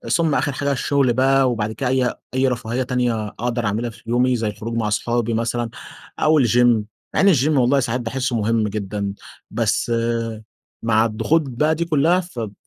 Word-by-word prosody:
ثم 165 -4 +2
آخر 145 - 0
حاجة 140 +1 -2
الشغل 135 -1 +1
بقى، 135 +1 +3
وبعد 110 -2 -2
كده 125 +2 -2
أي 130 -1 +1 0.2
أي 130 +1 +2
رفاهية 125 0 -2
تانية 120 -4 -1
أقدر 120 +2 -3
أعملها 110 +4 -1
في 115 - -15
يومي 125 +1 +2
زي 115 -2 -1
الخروج 110 +3 -5
مع 110 -2 0
أصحابي 115 +2 0
مثلًا 115 +1 -1 0.5
أو 155 -1 +4
الgym 120 0 +4 0.5
مع - - +3
إن 195 -2 +6
الgym 140 +1 +2
والله 140 -2 +3
ساعات 125 -1 -1
باحسه 125 +1 -2
مهم 110 0 +1
جدًا، 100 -1 -3 0.4
بس - - 0 0.9
مع 110 -1 +3
الضغوط 115 +9 +1
بقى 150 +6 +1
دي 170 +2 -2
كلها 165 +3 +3
فب 120 - -6
120 Hz, 175 wpm, -21 LUFS, 115-135 Hz, 0.9 s, إن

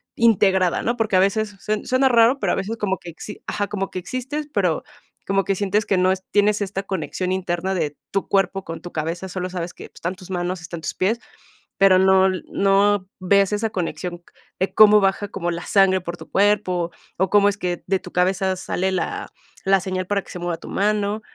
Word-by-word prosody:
integrada, 190 -5 +3
¿no?, 235 - 0
porque 220 -4 0
a - - +5
veces 205 +2 +1
sue 215 0 -2
suena 255 +1 +3
raro, 240 +2 +5
pero - - +1
a - - +1
veces 205 +4 -3
como 195 -3 -1
que 175 - -10
exi 210 +5 -9
ajá, 205 -1 -1
como 195 -1 -3
que 185 - -4
existes, 265 - -4
pero 180 -7 +1 0.4
como 195 0 +1
que 195 - +1
sientes 205 +2 0
que 195 - +1
no 185 +1 +3
es 190 - -2
tienes 205 0 +3
esta 195 0 -3
conexión 185 -1 -3
interna 185 0 -1
de 150 -4 -2 0.2
tu 195 - -1
cuerpo 195 -1 +1
con 165 0 -6
tu 175 - -9
cabeza, 165 +4 -3
solo 185 0 -4
sabes 175 -1 -5
que - - -11
pues - - -48
están 175 +3 -3
tus 185 0 -13
manos, 180 0 -2
están 165 0 -7
tus - - -3
pies, 215 +6 +1 0.6
pero 195 -1 +6
no 190 0 +5
no 195 +1 +1
ves 195 +2 +3
esa 220 +2 0
conexión 175 -1 -4 0.4
de 190 - -1
cómo 210 -1 +8
baja 195 +1 0
como 175 -4 -3
la 170 0 -5
sangre 195 -2 +4
por 175 0 -6
tu - - -12
cuerpo, 190 -4 +2 0.3
o 190 +1 +1
cómo 205 -1 +5
es 205 - -3
que 180 -3 -3
de 190 0 +1
tu 180 - -11
cabeza 185 +1 +1
sale 190 +1 -1
la 185 - -3 0.4
la 195 0 +4
señal 185 -1 -3
para 200 0 0
que - - -18
se 180 - -6
mueva 175 -1 -2
tu - - -12
mano, 210 +1 0
190 Hz, 215 wpm, -22 LUFS, 180-205 Hz, 0.6 s, cómo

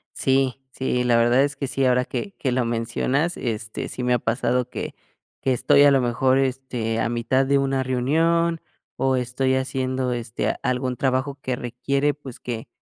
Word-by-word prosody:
Sí, 135 0 +1
sí, 125 -2 -1
la 120 -1 +3
verdad 120 +3 +4
es 140 -1 -1
que 140 - -3
sí, 135 - -1
ahora 125 0 +3
que 200 -2 -5
que 130 - -1
lo 125 -1 +1
mencionas, 120 +8 0
este, 110 -2 -4
sí 125 - -5
me 125 0 +2
ha 125 - +2
pasado 120 +2 0
que - - -5 0.5
que 130 - +1
estoy 135 +3 +4
a 145 - +7
lo 135 - +4
mejor, 130 +2 +2
este, 130 -4 -1
a - - 0
mitad 120 +3 +1
de 140 +1 +3
una 135 -1 +1
reunión 165 +6 +1 0.3
o 130 0 +1
estoy 130 +2 0
haciendo, 130 -1 -1
este, 120 -1 -2
algún 125 0 -1
trabajo 130 +2 0
que 130 -1 -2
requiere, 135 +4 -1
pues, 135 -4 -11
que 115 -2 -5
130 Hz, 185 wpm, -23 LUFS, 125-135 Hz, 0.5 s, a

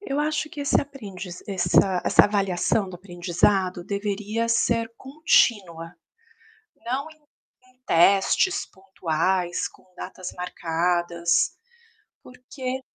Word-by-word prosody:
Eu 285 -8 -3
acho 305 0 -1
que 295 - -8
esse 280 - +2
aprendiza 200 -10 -8
essa 180 -1 +2
essa - - +6
avaliação 200 0 0
do 185 - -9
aprendizado 180 0 0
deveria 210 +3 -2
ser 230 0 +1
contínua. 205 - +1 0.9
Não 265 +5 -2
em 310 -1 -20 0.5
em - - -42
testes 195 - +3
pontuais, 185 -1 -2
com - - -22
datas 185 0 -7
marcadas, 170 -1 0 0.7
porque 255 +1 -6
195 Hz, 100 wpm, -24 LUFS, 175-240 Hz, 0.9 s, essa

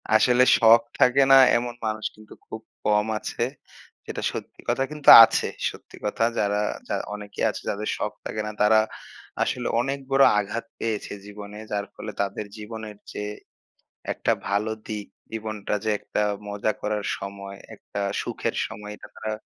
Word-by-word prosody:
আসলে 125 +3 +5
শখ 115 0 +7 0.2
থাকে 125 +2 +5
না - - +10 0.2
এমন 120 0 -4
মানুষ 110 0 -2
কিন্তু 110 0 -15
খুব 110 - -7 0.2
কম 105 0 +3
আছে। 115 - -3 0.6
যেটা - - -5
সত্যি - - -8
কথা 135 - +1
কিন্তু 150 -2 +2
আছে। - - +2 0.2
সত্যি - - -13
কথা 105 +2 0 0.2
যারা 105 0 +1 0.5
অনেকে 105 -1 -8
আছে - - -5
যাদের 105 +1 -3
শখ - - -3
থাকে 110 - -3
না - - -3
তারা 110 +1 +6 0.6
আসলে 125 -1 -2
অনেক 135 +2 -2
বড় 135 0 +6 0.2
আঘাত 105 +3 -3
পেয়েছে 110 -3 -3
জীবনে। 105 0 -9
যার 100 -1 -1
ফলে 105 - -6
তাদের 100 +1 -3
জীবনের 110 -1 -8
চেয়ে 105 0 -5 0.8
একটা - - 0 0.2
ভালো 105 +2 0 0.2
দিক 105 -2 -4 0.3
জীবনটা 110 -2 -3
যে, 110 - +1
একটা - - -3 0.3
মজা 105 +1 -1
করার 105 -1 -2
সময়, 100 0 -7 0.2
একটা 100 - -7 0.2
সুখের - - -3
সময় 105 +1 -9
এটা 105 - -13
তারা। 110 0 -4
105 Hz, 155 wpm, -25 LUFS, 105-115 Hz, 0.8 s, না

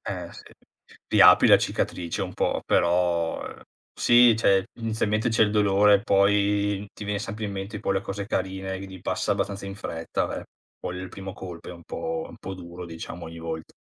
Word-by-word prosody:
Eh - - -6
sì, - - -12 0.7
riapri - - +7
la - - +8
cicatrice 90 +3 -2
un 90 -1 -4
po' - - 0
però, 85 -1 +1
uhm, - - -9 0.3
sì 120 -1 +6
cioè, 95 -4 +3 0.2
inizialmente 110 0 0
c'è 110 0 +3
il 105 - +3
dolore, 105 -1 +4
poi 100 0 +2
ti 105 - -9
viene 105 0 -1
sempre 110 +1 -5
in 100 - -3
mente 100 +2 -5
poi 100 - -1
le 95 - +1
cose 100 0 -5
carine, 95 -2 -3
quindi 95 -1 -9
passa - - -1
abbastanza 100 0 -3
in 95 - -6
fretta, 80 -3 -3
ve - - -5 0.3
poi 90 - -5
il 95 - -6
primo 95 0 -8
colpo 90 -3 -9
è - - -6
un 85 -1 -12
po' 80 0 -4
un - - -12
po' 95 0 -6
duro 90 0 -9
diciamo, 85 +1 -8
ogni 85 0 -9
volta. 80 -1 -6
95 Hz, 190 wpm, -25 LUFS, 90-105 Hz, 0.7 s, la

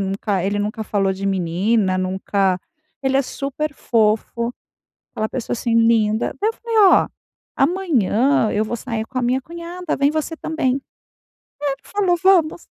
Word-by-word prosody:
nunca 195 -1 -1
ele 200 +2 -1
nunca 210 +2 -2
falou 195 -2 0
de 195 +1 -4
menina 190 +2 +1
nunca 190 0 0 0.4
ele 265 0 +2
é 275 - +3
super 280 +3 -4
fofo, 230 +1 0 0.6
aquela 215 0 -2
pessoa, 255 -3 -4
assim, 235 0 -1
linda. 225 -1 +3
Daí, 430 - +2
eu - - 0
falei: 460 -2 -2 0.2
"Ó, - - +3 0.5
amanhã 275 - +2
eu 215 +1 +1
vou 235 +2 -3
sair 225 -2 -4
com 255 - -4
a - - -1
minha 250 +2 +1
cunhada. 340 +1 -5
Vem 280 +1 +3
você 315 +1 -2
também". 275 -5 -1 0.8
Aí, 290 - +1
ele 275 - -5
falou: 380 -4 +1
"Vamos". 350 -3 +3
235 Hz, 160 wpm, -20 LUFS, 205-300 Hz, 0.8 s, é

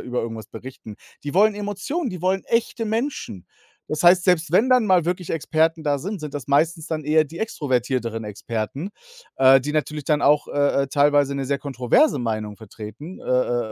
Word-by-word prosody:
über 125 0 -3
irgendwas 115 -2 -6
berichten. 110 -2 -10 0.3
Die 145 - -5
wollen 210 +2 +4
Emotionen, 205 - -3
die 180 -3 -7
wollen 190 +1 0
echte 230 0 -1
Menschen. 220 - -3 0.4
Das 155 - -2
heißt, 175 0 +6
selbst 175 -3 +2
wenn 220 +8 +4
dann 250 -3 +4
mal 185 -5 +3
wirklich 180 0 -3
Experten 160 0 0
da 145 -1 +1
sind, 200 +6 -5
sind 150 -1 -7
das 140 -1 -6
meistens 160 +3 +1
dann 155 -2 -3
eher 155 +1 +4
die 160 +4 -11
extrovertierteren 125 - -2
Experten, 115 - -5 0.5
äh, 135 0 +6
die 150 +3 -4
natürlich 150 -1 -2
dann 150 -1 +1
auch, 145 +1 +3
äh, 145 -1 +1
äh, - - -2
teilweise 145 0 +3
'ne 135 - -2
sehr 140 0 0
kontroverse 140 - +2
Meinung 110 -3 -3
vertreten, 110 - -10
äh, - - -14
äh, 120 -3 0
150 Hz, 190 wpm, -22 LUFS, 125-180 Hz, 0.5 s, heißt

